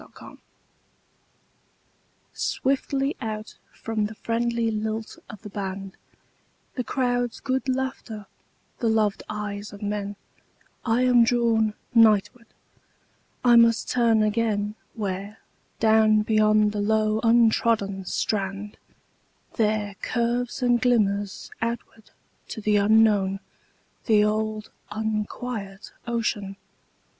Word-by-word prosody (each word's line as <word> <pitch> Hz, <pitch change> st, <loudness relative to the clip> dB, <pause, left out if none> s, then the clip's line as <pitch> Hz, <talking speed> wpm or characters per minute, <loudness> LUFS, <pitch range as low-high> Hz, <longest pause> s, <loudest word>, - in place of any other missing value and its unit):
Seaside -, -, -14 dB, 2.0 s
SWIFTLY 275 Hz, +1 st, -1 dB
out 215 Hz, -2 st, -5 dB, 0.2 s
from 220 Hz, -2 st, -2 dB
the 220 Hz, -, -10 dB
friendly 235 Hz, 0 st, -1 dB
lilt 220 Hz, +1 st, -4 dB
of 215 Hz, -, -11 dB
the 210 Hz, -, -7 dB
band, 195 Hz, -1 st, -5 dB, 0.8 s
The 250 Hz, -, -3 dB
crowd's 245 Hz, -2 st, -1 dB
good 265 Hz, 0 st, -2 dB
laughter, 255 Hz, -5 st, -3 dB, 0.5 s
the 235 Hz, -, 0 dB
loved 215 Hz, -2 st, +1 dB
eyes 210 Hz, -1 st, -5 dB
of 205 Hz, 0 st, -10 dB
men,I 205 Hz, +3 st, -4 dB
am 245 Hz, -2 st, +5 dB
drawn 230 Hz, -3 st, +2 dB, 0.2 s
nightward; 225 Hz, +1 st, +4 dB, 1.0 s
I 240 Hz, -1 st, +7 dB
must 230 Hz, -1 st, +4 dB
turn 230 Hz, -3 st, +3 dB
againWhere, 210 Hz, -2 st, -2 dB, 0.4 s
down 220 Hz, -1 st, +4 dB
beyond 215 Hz, -1 st, +3 dB
the 205 Hz, -1 st, -2 dB
low 215 Hz, +1 st, +1 dB
untrodden 225 Hz, -4 st, +2 dB
strand, 200 Hz, +1 st, -3 dB, 0.7 s
There 210 Hz, -2 st, 0 dB
curves 240 Hz, +1 st, -1 dB
and 245 Hz, -1 st, +3 dB
glimmers 205 Hz, -5 st, 0 dB
outward 230 Hz, -1 st, -5 dB, 0.4 s
to -, -, -6 dB
the 210 Hz, -1 st, +2 dB
unknownThe 210 Hz, 0 st, +1 dB
old 215 Hz, 0 st, -2 dB, 0.2 s
unquiet 215 Hz, -1 st, -4 dB, 0.2 s
ocean. 215 Hz, -4 st, -2 dB
220 Hz, 95 wpm, -25 LUFS, 210-235 Hz, 2.0 s, I